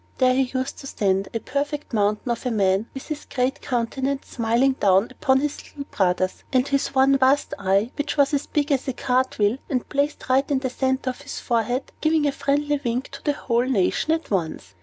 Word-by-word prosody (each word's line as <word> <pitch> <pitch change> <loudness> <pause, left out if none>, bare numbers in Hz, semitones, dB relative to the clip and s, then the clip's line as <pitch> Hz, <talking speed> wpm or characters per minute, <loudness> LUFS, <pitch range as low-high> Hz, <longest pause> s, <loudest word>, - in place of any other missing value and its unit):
There 255 -1 +4
he 260 0 +1
used 260 +1 -3
to 275 - -8
stand, 195 -5 0
a 225 - -2
perfect 285 +3 -3
mountain 210 +3 +1
of 235 - -3
a - - +1
man, 200 -1 +1
with 270 - -8
his 305 -1 -5
great 260 +2 -1
countenance 265 +3 -2
smiling 235 +3 +2
down 195 +2 +4
upon 265 0 +2
his 295 0 -2
little 285 - -8
brothers, 185 -1 0
and 260 0 +2
his 275 -1 0
one 270 +1 +5
vast 265 +2 +3
eye 195 +4 +1
(which 290 +1 -3
was 280 +1 +3
as 285 - 0
big 295 0 0
as 270 -1 +1
a 265 - -1
cart 255 +1 0
wheel, 210 +5 +2
and 255 -4 -1
placed 285 +1 -1
right 265 +1 +2
in 280 - +2
the 260 -1 -2
center 260 0 0
of 255 - -13
his 285 -1 -6
forehead) 240 +2 -1
giving 310 -1 +2
a 285 - +2
friendly 290 +1 0
wink 245 +2 -2
to - - -10
the 295 - +1
whole 240 -3 0
nation 255 +5 +1
at 325 -5 -1
once. 160 - -2
260 Hz, 215 wpm, -23 LUFS, 230-280 Hz, -, one